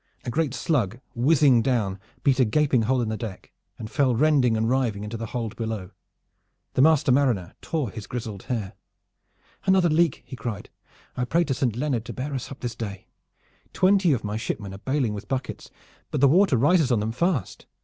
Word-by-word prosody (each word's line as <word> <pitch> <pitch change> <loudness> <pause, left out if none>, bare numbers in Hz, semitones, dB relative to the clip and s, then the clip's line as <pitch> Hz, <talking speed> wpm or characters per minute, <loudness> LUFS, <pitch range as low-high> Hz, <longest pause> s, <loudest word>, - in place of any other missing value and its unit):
A 120 - -2
great 150 -1 0
slug, 120 - 0
whizzing 135 -1 +4
down, 110 -7 0 0.2
beat 135 -2 +3
a - - +6
gaping 130 +2 +2
hole 125 +2 +1
in 110 - -2
the 110 - -2
deck, 110 -4 -7 0.3
and 110 - -6
fell 130 +1 +1
rending 130 -4 +3
and 110 +1 0
riving 120 -5 0
into 105 +2 -5
the 115 0 -4
hold 115 -2 -4
below. 110 -5 -4 0.8
The - - +2
master 155 -1 +4
mariner 125 -10 +1
tore 150 - -2
his 110 -2 -8
grizzled 110 -5 -5
hair. 110 -7 -3 0.9
"Another 190 -3 +4
leak!" 160 -1 +2
he 130 - -8
cried. 115 -5 -6 0.4
"I 125 - -1
pray 170 +7 +2
to 145 -5 -1
Saint 125 -4 -1
Leonard 125 -3 -1
to - - -6
bear 140 +3 -4
us 130 - -4
up 135 - -10
this 120 -2 -3
day! 100 -4 -7 0.6
Twenty 190 -2 +4
of 125 -5 0
my 105 +1 -3
shipmen 105 -3 -4
are 95 - -9
bailing 130 -2 0
with 100 - -7
buckets, 130 -1 -4 0.4
but - - -2
the 140 - +6
water 170 -1 +4
rises 150 +2 +3
on 120 - +3
them 110 +2 -2
fast. 145 - -2
125 Hz, 195 wpm, -25 LUFS, 110-145 Hz, 0.9 s, a